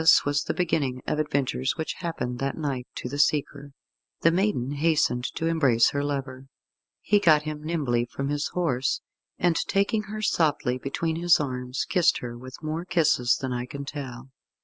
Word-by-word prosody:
This 160 - +6
was 145 0 +1
the - - -2
beginning 145 -8 0
of 150 - -1
adventures 140 -3 0
which 160 - -2
happened 160 -8 -3
that 135 0 -2
night 135 -5 -3
to - - -4
the 145 +3 -5
seeker. 145 -1 +1 0.5
The 165 - +5
maiden 180 - 0
hastened 145 -4 +1
to 165 - -2
embrace 140 -9 +3
her 140 0 -1
lover. 135 -2 -4 0.5
He 205 - +3
got 155 -6 +5
him 150 -1 -5
nimbly 140 -8 0
from 135 +3 -4
his 145 0 -1
horse, 135 -7 0 0.4
and 175 -1 +2
taking 200 +5 +1
her 215 0 -5
softly 150 -9 +1
between 160 +5 -2
his 175 0 +4
arms, 125 -2 -3
kissed 180 -2 +3
her 120 -1 -6
with 130 +5 -11
more 155 +2 -2
kisses 155 -9 +2
than 130 -2 -3
I 125 0 -3
can 140 +2 -6
tell. 135 -3 -7
145 Hz, 175 wpm, -26 LUFS, 130-165 Hz, 0.5 s, This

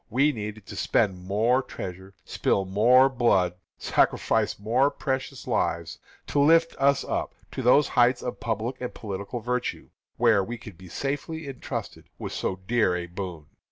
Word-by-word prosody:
We 135 +6 +3
needed 105 -4 -6
to 100 - -9
spend 95 -2 0
more 115 +7 +2
treasure, 95 -4 -8
spill 95 - 0
more 120 +7 +5
blood, 115 -9 +2 0.2
sacrifice - - +1
more 120 +7 +2
precious 130 -2 -4
lives, 85 0 -1 0.3
to 145 - -1
lift 165 +3 +4
us 140 0 +3
up - - -3 0.2
to - - -4
those 130 +4 +5
heights 120 +1 +3
of 125 - -4
public 115 +3 -3
and 125 - -3
political 100 +2 -5
virtue, 125 +2 -3 0.3
where 105 -3 +4
we 120 +4 -5
could 110 -4 -11
be 90 +1 -13
safely 145 - -4
entrusted 135 -2 -6
with - - -6
so 95 - -2
dear 115 -5 +2
a 90 0 -3
boon. 85 -3 -6
115 Hz, 160 wpm, -26 LUFS, 95-130 Hz, 0.3 s, more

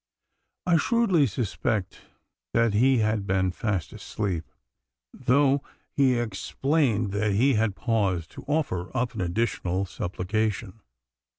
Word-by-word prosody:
I 175 -2 +4
shrewdly 195 - +3
suspect 105 -2 -2 0.5
that 115 -2 +3
he 130 +5 +4
had 110 -2 -1
been 95 -1 +1
fast 95 -3 -2
asleep, 95 -7 -4 0.6
though 135 +2 +3 0.3
he 130 -3 +3
explained 120 +1 0
that 100 +1 0
he 130 +7 +3
had 110 -3 +1
paused 95 -6 0
to - - -10
offer 135 - -1
up 125 0 0
an 110 - -4
additional 90 0 -1
supplication. 100 +3 -3
110 Hz, 115 wpm, -26 LUFS, 95-130 Hz, 0.6 s, I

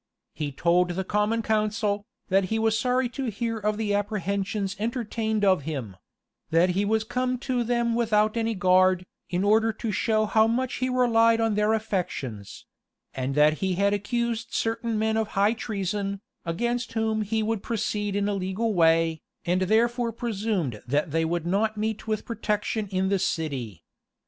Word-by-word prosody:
He 150 -2 -3
told 175 +5 +2
the 180 +2 -2
common 210 +4 0
council, 210 -1 0 0.2
that 195 0 +3
he 220 +4 -1
was 220 0 +2
sorry 255 +1 +1
to 265 +2 -4
hear 225 +2 -3
of 210 0 -1
the 215 -2 -1
apprehensions 200 -1 -1
entertained 220 -2 -1
of 185 -5 +4
him; 135 -10 -5 0.5
that 170 +3 +4
he 195 +3 +1
was 220 +1 +1
come 250 +2 -1
to 250 -3 0
them 235 0 +1
without 215 -2 +2
any 225 -1 0
guard, 185 -1 +3 0.2
in 180 +1 0
order 220 +2 +4
to 220 +1 -3
show 215 +2 +1
how 220 +1 +4
much 245 +3 -1
he 255 +1 -1
relied 230 -2 +4
on 225 -1 +2
their 210 +1 +2
affections; 175 - -4 0.5
and 130 +1 -3
that 150 +1 +4
he 190 -1 0
had 200 +2 +2
accused 230 +2 -2
certain 230 0 -1
men 220 +1 +1
of 220 -1 0
high 205 +3 +4
treason, 200 -3 -3 0.3
against 240 +9 -2
whom 220 -1 0
he 220 +1 -1
would 220 -1 -1
proceed 205 -2 -2
in 200 0 +1
a 205 - 0
legal 195 +4 -1
way, 165 -2 +3 0.2
and 180 +2 +1
therefore 235 +4 +2
presumed 205 - -2
that 145 +4 0
they 165 +2 +1
would 170 0 -1
not 215 +4 0
meet 220 +1 -3
with 215 -1 -2
protection 215 -1 -2
in 190 0 0
the 195 -1 +2
city. 135 - -3
210 Hz, 170 wpm, -26 LUFS, 185-225 Hz, 0.5 s, of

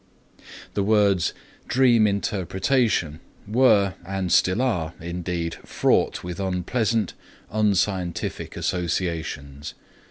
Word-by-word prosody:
The 100 - 0
words 100 -4 +3 0.4
"dream 120 -4 +4
interpretation" 100 - 0 0.3
were 105 -4 +4
and 95 0 -3
still 90 +4 +3
are 90 -11 -1
indeed 85 0 -4
fraught - - +1
with 90 +1 -6
unpleasant, 100 +3 0 0.4
unscientific 100 -4 -1
associations. 80 -5 -3
95 Hz, 85 wpm, -24 LUFS, 85-105 Hz, 0.4 s, dream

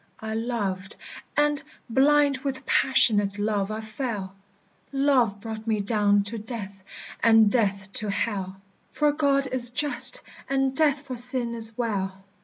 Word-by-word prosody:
"I 220 0 -5
loved, 210 -5 -3 0.4
and, 295 0 +2 0.3
blind 280 +2 +3
with 270 -2 -5
passionate 205 -6 +2
love, 205 -1 -1
I 215 +1 -4
fell. 215 -4 -5 0.6
Love 270 -7 +2
brought 220 +1 -7
me 220 -2 +1
down 205 -1 +2
to 220 +3 -4
death, 205 -3 -8 0.4
and 225 -2 +5
death 195 -4 0
to 215 - -3
Hell; 195 -2 -3 0.3
For 300 -1 +2
God 280 -2 +1
is 250 -2 +2
just, 285 +4 +1 0.3
and 270 -1 0
death 290 -2 +2
for 255 -3 -7
sin 245 -1 +4
is 225 -1 +2
well. 195 -5 -3
225 Hz, 140 wpm, -25 LUFS, 205-265 Hz, 0.6 s, and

